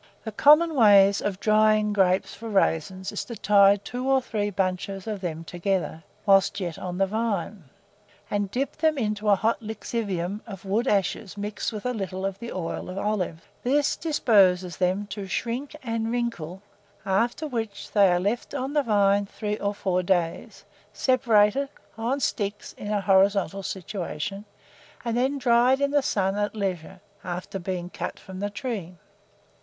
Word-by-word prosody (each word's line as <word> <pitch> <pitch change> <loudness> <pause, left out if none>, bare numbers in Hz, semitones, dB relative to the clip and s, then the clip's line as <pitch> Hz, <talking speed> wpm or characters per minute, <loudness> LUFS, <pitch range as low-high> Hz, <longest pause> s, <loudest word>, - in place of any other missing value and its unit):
The 220 - -5
common 300 +9 +5
way 205 -7 +7
of 195 -2 -2
drying 215 0 +3
grapes 190 0 +2
for 225 +2 -8
raisins 190 -1 0
is - - -3
to 235 - -7
tie 200 -1 +5
two 245 +6 -5
or 270 0 +5
three 215 -5 -2
bunches 190 0 -2
of 210 -3 -4
them 165 -3 -4
together, 175 -2 -2 0.2
whilst 195 0 +4
yet 175 -4 -4
on 180 -1 -5
the 195 - +3
vine, 205 -3 -2 0.6
and 205 -1 -1
dip 265 +7 -2
them 310 -1 +2
into 215 -3 -1
a 200 - +7
hot 225 +5 0
lixivium 210 -3 -3
of 195 -3 -9
wood 215 +6 0
ashes 200 0 0
mixed 205 +3 -3
with 215 0 -7
a 250 - 0
little 190 -3 -4
of 195 0 -3
the 235 0 -6
oil 180 0 -4
of 185 - -6
olives: 190 -5 -2 0.2
this 285 +3 +2
disposes 195 - +3
them 185 +3 0
to 200 -2 -5
shrink 240 +10 -3
and 225 -2 -2
wrinkle, 200 -7 -3 0.4
after 230 +10 0
which 225 -6 -5
they 200 -3 +5
are 175 - +2
left 210 +9 -2
on 270 +1 -3
the 295 - +3
vine 200 -4 +2
three 210 0 -4
or 205 0 -1
four 185 -2 0
days, 175 -2 -1 0.3
separated, 255 0 +3 0.3
on 235 +5 -1
sticks 205 -5 -2
in - - -8
a 205 -1 +1
horizontal 195 -1 +3
situation, 190 0 -5 0.6
and 230 -1 -1
then 260 +4 +1
dried 250 0 +4
in 280 0 +1
the 290 0 +3
sun 195 -7 0
at 205 +1 -1
leisure, 190 -6 -4 0.2
after 180 +2 -5
being 180 -1 -4
cut - - -5
from 190 0 -9
the 205 +1 -2
tree. 205 -6 -5
205 Hz, 165 wpm, -25 LUFS, 190-230 Hz, 0.6 s, way